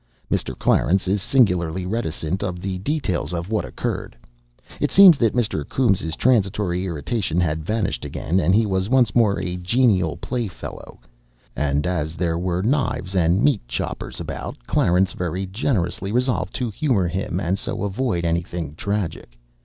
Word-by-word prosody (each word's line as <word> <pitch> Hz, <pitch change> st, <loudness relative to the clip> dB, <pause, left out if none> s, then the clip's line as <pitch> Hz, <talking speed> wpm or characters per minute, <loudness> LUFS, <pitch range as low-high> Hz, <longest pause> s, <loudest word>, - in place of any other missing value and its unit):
Mr. -, -, -1 dB
Clarence 95 Hz, +2 st, +2 dB
is 100 Hz, +1 st, +1 dB
singularly 90 Hz, -8 st, +2 dB
reticent 90 Hz, -4 st, -2 dB
of 90 Hz, -4 st, -3 dB
the 95 Hz, 0 st, -4 dB
details 95 Hz, -, -1 dB
of 85 Hz, +4 st, -4 dB
what 110 Hz, -, +1 dB
occurred. -, -, -4 dB, 0.6 s
It -, -, +1 dB
seems 190 Hz, -4 st, +9 dB
that 115 Hz, -2 st, +2 dB
Mr. 110 Hz, -11 st, 0 dB
Coombes' 95 Hz, -11 st, +1 dB
transitory 95 Hz, -6 st, +1 dB
irritation 90 Hz, -, -2 dB
had 80 Hz, -3 st, 0 dB
vanished 105 Hz, -, -1 dB
again, 90 Hz, +4 st, -1 dB
and 90 Hz, +2 st, +3 dB
he 110 Hz, +1 st, +4 dB
was 95 Hz, 0 st, -1 dB
once 125 Hz, -4 st, +3 dB
more 110 Hz, -4 st, +3 dB
a 90 Hz, -1 st, -3 dB
genial 90 Hz, -, +2 dB
playfellow. 120 Hz, -7 st, -6 dB, 0.6 s
And 75 Hz, +1 st, 0 dB
as 80 Hz, -3 st, -2 dB
there 85 Hz, -1 st, -1 dB
were 90 Hz, 0 st, -1 dB
knives 120 Hz, -6 st, 0 dB
and 90 Hz, +2 st, +3 dB
meat 140 Hz, -7 st, +3 dB
choppers -, -, -4 dB
about, -, -, -5 dB
Clarence 90 Hz, +6 st, +2 dB
very 90 Hz, +2 st, -3 dB
generously 95 Hz, -3 st, -1 dB
resolved 125 Hz, +2 st, 0 dB
to 125 Hz, -4 st, -2 dB
humour 110 Hz, -, +1 dB
him 90 Hz, 0 st, -2 dB
and 95 Hz, +1 st, -1 dB
so -, -, -4 dB
avoid 100 Hz, -3 st, -1 dB
anything 85 Hz, -2 st, -2 dB
tragic. 85 Hz, -9 st, -4 dB
95 Hz, 155 wpm, -22 LUFS, 85-110 Hz, 0.6 s, seems